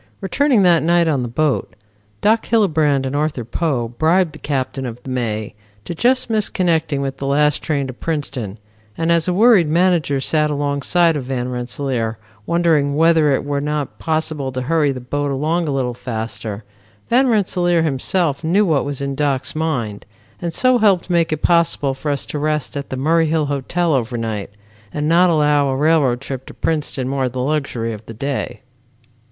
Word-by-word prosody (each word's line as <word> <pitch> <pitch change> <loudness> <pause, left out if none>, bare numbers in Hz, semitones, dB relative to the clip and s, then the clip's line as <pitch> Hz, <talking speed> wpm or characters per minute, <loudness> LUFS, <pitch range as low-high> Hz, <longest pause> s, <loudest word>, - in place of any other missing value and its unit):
Returning 245 +3 +2
that 175 -3 +5
night 170 +1 +3
on 145 -5 +1
the 120 - -2
boat, 135 -2 -1 0.5
Doc 220 +2 +2
Hillebrand 155 - +2
and 130 +1 -3
Arthur 145 -5 -1
Poe 125 -3 -1
bribed 160 +6 +1
the - - -11
captain 135 -2 -3
of 115 -1 -6
The 130 - -6
May 110 -4 -2 0.3
to - - -4
just 255 +9 +2
miss 215 -2 +1
connecting 160 -5 0
with 135 -1 -3
the 135 - -4
last 150 +1 +2
train 145 -3 -1
to 130 - -6
Princeton, 130 -8 -4 0.4
and 165 +1 0
as 170 0 +2
a - - +2
worried 215 -5 +5
manager 165 -4 +2
sat 150 +3 +1
alongside 145 +4 +1
of 140 -4 -3
Van 125 -1 -3
Rensselaer 125 -2 -3 0.3
wondering 160 -5 +2
whether 160 -1 +4
it 135 0 0
were 145 -1 -1
not 150 -1 -3
possible 155 -4 -2
to 130 0 -3
hurry 150 0 +2
the 130 - -5
boat 145 +3 -2
along 155 +5 0
a - - -1
little 130 -3 -1
faster, 115 -3 -5 0.4
Van 260 +3 +3
Rensselaer 180 -6 +2
himself 155 +1 0
knew 190 +6 +3
what 155 -6 +2
was 140 -1 -4
in 140 0 -2
Doc's 135 -1 -1
mind 120 -12 -2 0.3
and 170 -1 -2
so 255 +7 +3
helped 195 -5 +2
make 170 -2 +2
it 155 -1 -3
possible 170 -5 +2
for 140 +3 -5
us 140 -2 -1
to 150 - -5
rest 150 -1 -1
at 140 -1 -5
the 130 - -4
Murray 160 +4 +2
Hill 155 -1 +1
Hotel 150 +4 -1
over 120 -2 -1
night, 110 -3 -3 0.4
and 150 0 -2
not 175 +3 +5
allow 150 -3 +3
a 135 - 0
railroad 140 -4 +2
trip 135 -1 -6
to - - -11
Princeton 150 -5 -2
mar 135 -1 -1
the 125 +1 -6
luxury 135 -6 -2
of 105 0 -9
the 115 - -8
day. 135 +4 -3
145 Hz, 185 wpm, -19 LUFS, 130-165 Hz, 0.5 s, that